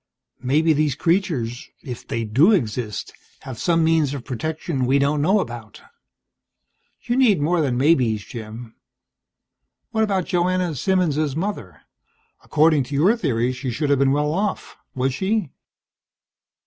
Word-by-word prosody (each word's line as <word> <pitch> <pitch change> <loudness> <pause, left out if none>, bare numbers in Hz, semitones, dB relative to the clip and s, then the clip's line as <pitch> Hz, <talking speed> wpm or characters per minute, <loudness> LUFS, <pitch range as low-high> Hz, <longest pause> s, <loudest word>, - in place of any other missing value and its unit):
Maybe 155 +6 +2
these 150 -2 +1
creatures 150 - -1
if 125 -3 -8
they 115 - -2
do 130 - +4
exist 115 - -2 0.3
have 130 -4 -8
some 165 -1 +2
means 160 -3 +2
of 130 - -8
protection 145 +1 -3
we 135 +2 +3
don't 145 +1 +1
know 190 +8 +3
about." 120 - -7 1.2
"You 240 +1 -1
need 240 - +4
more 165 +3 +1
than 130 -5 0
maybes, 125 -7 +2
Jim. 115 0 -9 1.2
What 220 -1 +1
about 195 -4 0
Joanna 180 -1 0
Simmons' 155 -3 0
mother? 155 - -4 0.6
According 155 -1 +3
to 140 - -6
your 180 +11 +4
theories 130 - -1
she 130 -1 -4
should 145 +4 -1
have 140 - +3
been 135 -1 +3
well 150 +2 +1
off. 195 +3 -3 0.2
Was 130 0 0
she?" 195 0 -1
145 Hz, 140 wpm, -22 LUFS, 125-175 Hz, 1.2 s, do